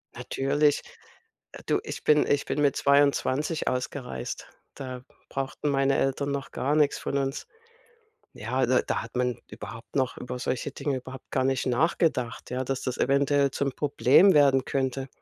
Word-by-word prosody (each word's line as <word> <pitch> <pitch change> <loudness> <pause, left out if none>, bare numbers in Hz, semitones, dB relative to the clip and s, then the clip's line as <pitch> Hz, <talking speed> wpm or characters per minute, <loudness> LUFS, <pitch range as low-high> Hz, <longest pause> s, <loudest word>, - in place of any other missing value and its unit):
Natürlich, 145 +2 +1 0.8
du, - - +1
ich - - -7
bin 150 -1 +4
ich 145 0 +1
bin 150 - -1
mit 140 -2 +3
22 140 +2 +2
ausgereist, 125 - -4 0.3
da 130 -2 -7 0.3
brauchten 135 +2 -3
meine 135 0 +2
Eltern 140 +1 0
noch 140 -1 -4
gar 145 +3 0
nix 150 -2 +3
von 140 - -2
uns. 135 +1 -2 0.9
Ja, 125 +3 -1
da 130 +1 +3
da - - -2
hat 115 +2 -10
man 125 -1 0
überhaupt 115 +4 -9
noch 130 -2 0
über 125 0 -6
solche 130 +3 -2
Dinge 140 -1 -2
überhaupt 130 +1 -11
gar 130 -1 +1
nicht 135 -1 0
nachgedacht, 130 -3 0
ja, 130 +1 -2
dass 135 0 -3
das 130 -2 -3
eventuell 140 +1 +2
zum 140 0 -1
Problem 145 +6 +4
werden 135 -3 +5
könnte, 135 0 -2
135 Hz, 160 wpm, -27 LUFS, 130-145 Hz, 0.9 s, werden